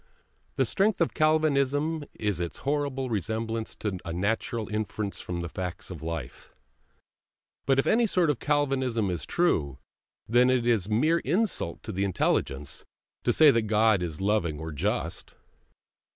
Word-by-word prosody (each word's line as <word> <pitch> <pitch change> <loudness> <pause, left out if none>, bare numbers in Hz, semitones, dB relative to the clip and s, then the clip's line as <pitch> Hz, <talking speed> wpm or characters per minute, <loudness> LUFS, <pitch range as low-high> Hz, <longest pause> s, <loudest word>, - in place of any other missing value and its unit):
The - - +2
strength 205 +1 +1
of 170 - +1
Calvinism 155 0 +2
is 105 -5 -1
its 85 -1 -3
horrible 140 -3 -1
resemblance 110 +2 -2
to 100 -4 -3
a 85 - -5
natural 110 +5 -1
inference 105 -1 -3
from 85 -1 -4
the 85 - -4
facts 90 +1 -5
of 85 - -7
life; 80 0 -6 1.2
but 135 - +4
if 135 - +2
any 230 +1 +3
sort 180 -6 +2
of 135 - -4
Calvinism 130 -8 0
is 85 - -4
true, 75 - +1 0.5
then 125 +3 +4
it 125 -2 +2
is 110 -6 +2
a - - -7
mere 155 +10 +3
insult 175 - -1
to 110 - -5
the 95 0 -1
intelligence 75 -7 -1 0.4
to - - +4
say 155 -2 +7
that 115 -4 +1
God 110 -2 +3
is 80 -3 -4
loving 95 -7 0
or 80 0 -5
just. 75 - -3
110 Hz, 155 wpm, -27 LUFS, 90-145 Hz, 1.2 s, say